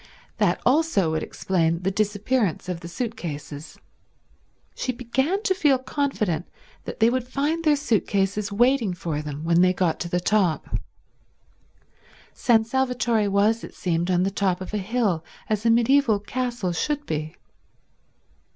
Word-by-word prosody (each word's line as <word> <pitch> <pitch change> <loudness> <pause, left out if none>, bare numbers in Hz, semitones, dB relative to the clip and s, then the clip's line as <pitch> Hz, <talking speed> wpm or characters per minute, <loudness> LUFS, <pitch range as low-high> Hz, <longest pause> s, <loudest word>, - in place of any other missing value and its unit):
That 190 -4 +2
also 260 - +3
would 160 0 -1
explain 170 -2 -1
the 195 - +1
disappearance 205 -1 0
of 180 -2 -3
the 170 - -8
suit 230 +6 -4
cases. 150 -1 -7 1.0
She 255 - -2
began 265 - -1
to 385 - +2
feel 295 -7 +3
confident 255 - -2 0.4
that - - -7
they 225 - +5
would 250 -1 -1
find 295 +5 -1
their 305 -2 +4
suit 275 -7 0
cases 200 0 0
waiting 235 -2 +2
for 160 -4 -3
them 150 0 -6
when 170 +1 +3
they 185 0 +4
got 180 -3 +1
up - - -22
to 170 - -4
the 180 - +1
top. 185 -3 +1 1.6
San 225 -2 +3
Salvatore 245 -3 +1
was, 210 +3 +2
it - - -9
seemed, 175 -1 -1
on 180 0 +2
the 195 - 0
top 190 -2 0
of 185 +2 -8
a - - +1
hill, 200 -5 0 0.2
as 215 +1 0
a - - +5
mediaeval 235 -1 +3
castle 240 -3 -2
should 290 - -2
be. 155 0 -4
210 Hz, 160 wpm, -24 LUFS, 175-250 Hz, 1.6 s, they